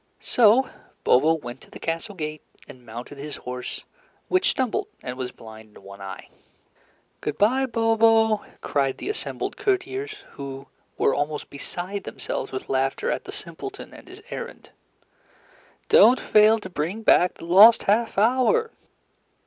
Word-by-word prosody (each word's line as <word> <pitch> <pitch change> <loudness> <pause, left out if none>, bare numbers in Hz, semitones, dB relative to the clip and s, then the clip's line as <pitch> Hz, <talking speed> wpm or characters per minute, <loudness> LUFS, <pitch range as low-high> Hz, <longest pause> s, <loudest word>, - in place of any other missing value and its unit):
So 240 +3 +4 0.4
Bobo 155 +6 +4
went 125 -5 -8
to - - -18
the - - -11
castle 165 +6 -4
gate, 155 -3 -5 0.3
and 125 - -13
mounted 120 +5 -9
his 145 +1 -6
horse, 125 0 -6 0.5
which 370 +2 +2
stumbled 265 - -1 0.2
and 125 - -5
was 130 -1 -5
blind 110 -1 -14
in - - -17
one 100 0 -12
eye. 95 -1 -8 0.9
"Good 150 0 -3
bye, 260 +6 +3
Bobo," 225 -2 +3 0.2
cried 135 -2 0
the - - -5
assembled 425 - -4
courtiers, 395 +2 -1 0.2
who 135 -1 -8 0.3
were 135 - +2
almost 150 +1 -3
beside 180 +7 -6
themselves 135 - -5
with 130 - -5
laughter 135 - 0
at - - -3
the - - -7
simpleton 405 0 -8
and - - -14
his 375 +3 -13
errand. - - -8 1.2
"Don't 250 +3 +6
fail 215 +1 +5
to - - -7
bring 180 +6 -4
back 180 -4 +4
the - - -11
lost 200 +7 +7
half 220 +2 +1
hour!" 260 - +3
195 Hz, 150 wpm, -24 LUFS, -, 1.2 s, lost